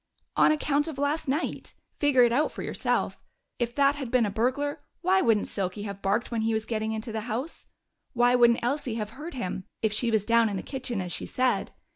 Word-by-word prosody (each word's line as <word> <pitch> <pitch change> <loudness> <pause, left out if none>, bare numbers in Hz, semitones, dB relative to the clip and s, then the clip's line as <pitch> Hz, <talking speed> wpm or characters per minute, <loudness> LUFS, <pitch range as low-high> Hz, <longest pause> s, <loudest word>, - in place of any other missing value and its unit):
"On - - +5
account 295 0 +1
of 310 -4 -5
last 285 +3 -1
night. 290 +5 -2 0.2
Figure 280 -4 +5
it 240 - +4
out 290 +6 +2
for - - -6
yourself. - - -1 0.4
If 240 0 -1
that 280 0 +4
had 270 -4 -4
been 250 -2 +3
a 205 - -2
burglar, 260 +7 -1 0.2
why 375 +2 +3
wouldn't 220 - +2
Silky 195 +1 -3
have 200 -1 -6
barked 210 +6 0
when 230 -2 0
he 225 0 +1
was 220 0 -2
getting 220 -1 -2
into 220 +1 -4
the 220 0 -3
house? 255 +9 -4 0.5
Why 245 0 +4
wouldn't 235 -1 +4
Elsie 250 -2 -1
have 215 -2 -4
heard 300 +6 -8
him, 185 -5 -4 0.2
if 220 -1 +2
she 235 +2 +1
was 220 -3 +1
down 230 -1 +4
in 200 - -3
the - - -5
kitchen, 255 -6 -4
as 180 -1 -5
she - - -4
said? 255 0 0
240 Hz, 220 wpm, -27 LUFS, 220-275 Hz, 0.5 s, On